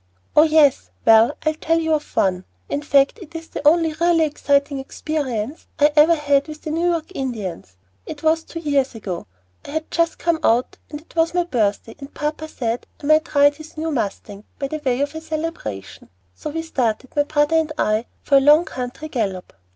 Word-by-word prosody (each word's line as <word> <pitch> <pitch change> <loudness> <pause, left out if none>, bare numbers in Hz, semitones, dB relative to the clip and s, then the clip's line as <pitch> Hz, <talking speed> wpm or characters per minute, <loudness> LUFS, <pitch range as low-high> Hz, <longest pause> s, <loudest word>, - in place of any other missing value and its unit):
"Oh, 300 - +8
yes 310 -3 +4 0.2
well, 225 +5 +6
I'll 310 - +2
tell 325 +1 0
you 320 -1 0
of 300 -1 -3
one; 185 -1 +1 0.3
in 285 - -2
fact 280 +5 +3
it 335 -2 -12
is 325 0 -7
the - - -5
only 325 0 +4
really 335 +1 +2
exciting 285 -2 +1
experience 270 -2 -4
I 295 +1 +4
ever 315 +3 +6
had 285 -2 +1
with 310 0 -9
the 310 - -4
New 335 +3 +1
York 335 0 -2
Indians. 205 - -5 0.3
It - - -8
was 320 +1 +2
two 330 - -8
years 280 -5 0
ago; 185 -6 -6 0.4
I - - -11
had 315 +2 -4
just 335 0 +1
come 335 -1 0
out, 235 +3 +1
and 295 0 -7
it 325 - -23
was 330 +1 +1
my 355 - +3
birthday, 225 -8 -1
and 275 0 -10
papa 300 +1 -4
said 235 -5 -3 0.2
I - - -5
might 310 +1 +2
ride 285 0 +5
his 315 0 -13
new 320 +1 -2
mustang, 205 -4 -4
by 275 - -3
way 255 -1 0
of 285 +1 -1
a 320 - -6
celebration. 310 - -6 0.2
So 90 - -7
we 325 +2 -4
started, 255 -5 -2
my 290 - +4
brother 295 +2 +2
and 320 -1 0
I, 215 -1 0 0.2
for 280 - +4
a - - +5
long 300 +5 +6
country 250 +5 -6
gallop. 200 -10 -3
295 Hz, 200 wpm, -21 LUFS, 250-320 Hz, 0.4 s, Oh